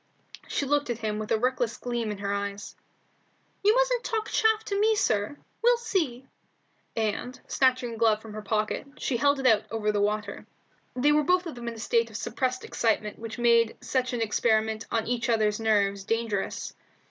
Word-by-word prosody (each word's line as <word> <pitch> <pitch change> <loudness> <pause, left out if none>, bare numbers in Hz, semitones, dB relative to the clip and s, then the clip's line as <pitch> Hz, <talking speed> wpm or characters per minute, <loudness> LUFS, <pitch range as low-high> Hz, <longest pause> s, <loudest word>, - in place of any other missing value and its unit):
She 280 - -1
looked 290 0 +1
at 240 - -1
him 215 -2 -2
with 215 - -5
a 225 - +4
reckless 245 -1 0
gleam 240 -2 -3
in 210 - -4
her 200 0 -2
eyes. 200 0 -4 0.9
"You 420 +3 +5
mustn't - - +2
talk 440 -2 -2
chaff 440 0 +2
to 400 0 -1
me, 440 +1 +4
sir; 220 - 0 0.2
we'll 485 +1 +5
see," 325 - -1 0.7
and, 225 +3 -2
snatching 255 -2 +2
a - - -7
glove 220 -2 +3
from 220 -1 -11
her 215 - -5
pocket, 215 +5 -1
she 250 - -1
held 285 +3 +3
it 265 - -4
out 220 -4 +4
over 215 -1 0
the 205 -1 0
water. 210 +1 -2 0.5
They 270 +4 +3
were 300 +1 +4
both 360 +4 +2
of 330 - -5
them 240 -1 -8
in 235 - -4
that - - -10
state 465 - +1
of - - -6
suppressed 255 -1 -2
excitement 215 -2 -1
which 225 +1 -6
made 235 -1 +3
such 255 +1 -1
an 240 -2 -2
experiment 220 0 +1
on 225 -1 0
each 245 0 -1
other's 215 -2 +2
nerve 200 -3 +1
dangerous. 225 -3 -2
235 Hz, 195 wpm, -27 LUFS, 215-275 Hz, 0.9 s, You